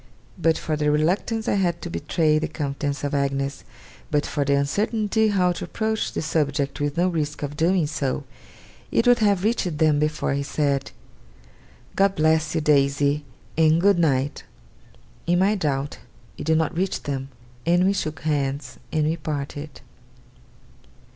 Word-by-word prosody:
But 165 -3 +2
for 155 - -2
the 150 0 +1
reluctance 185 +9 0
I - - +2
had 170 -2 0
to 175 - -4
betray 155 -3 +1
the - - -2
confidence 145 -1 -3
of 145 - -2
Agnes, 140 0 -1 0.5
but 150 -1 +1
for 145 - -1
my 140 - +4
uncertainty 210 +9 +1
how 185 -4 +2
to 175 - -5
approach 220 0 -2
the - - -2
subject 145 -3 -1
with 145 +1 -1
no 175 +2 +3
risk 150 -4 -2
of 145 0 -4
doing 170 +2 +2
so, 145 -2 -2 0.7
it 230 - +2
would 245 0 +5
have 200 -4 +2
reached 195 -7 0
them 155 -2 +3
before 150 -1 0
he 140 - -1
said, 140 -1 -1 1.1
'God 195 0 +3
bless 155 0 +2
you, 160 - +1
Daisy, 145 0 +2 0.3
and 160 0 +4
good 195 0 +4
night!' 140 -3 +1 0.8
In 175 +1 +3
my 195 +3 +3
doubt, 145 -7 -2 0.4
it - - -7
did 160 0 +3
NOT 160 +1 0
reach 190 +2 -1
them; 135 -1 -4 0.4
and 175 +2 +4
we 195 - +3
shook 155 -7 -3
hands, 140 -3 -2
and 155 -1 +1
we 160 +2 0
parted. 145 -1 -5
155 Hz, 160 wpm, -24 LUFS, 145-175 Hz, 1.1 s, would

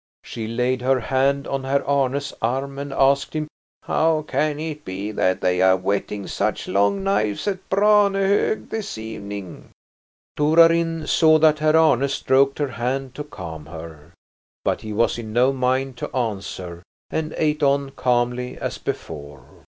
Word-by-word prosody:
She 110 -2 -6
laid 125 +2 0
her 130 +1 +2
hand 135 +3 +1
on 135 -1 -2
Herr 140 +1 0
Arne's 140 0 0
arm 135 +4 -2
and 140 0 -5
asked 140 +2 +2
him: 155 -1 -2 0.4
"How 160 -1 +1
can 150 -1 -1
it 155 -1 -5
be 95 +3 -5
that 95 -3 0
they 90 0 +1
are 95 0 +5
whetting 100 +1 -2
such - - -2
long 100 - +1
knives 110 - 0
at 190 -2 -3
Branehog 200 0 +3
this 215 - -4
evening?" 100 -4 -7 0.7
Torarin 165 +1 +4
saw 155 0 +5
that 155 -1 +4
Herr 155 +1 +3
Arne 140 -4 +4
stroked 135 0 +2
her 145 -2 -1
hand 130 +2 -3
to 150 - -5
calm 80 - -9
her. 80 0 -10 0.5
But - - 0
he 110 - -7
was 115 +2 +1
in 110 -2 -7
no 125 +3 +3
mind 130 0 0
to - - -6
answer 95 -7 -4 0.3
and 155 -1 -3
ate 150 -1 0
on 140 -1 +2
calmly 125 -1 -1
as - - -4
before. 70 -3 -6
135 Hz, 155 wpm, -22 LUFS, 110-155 Hz, 0.7 s, are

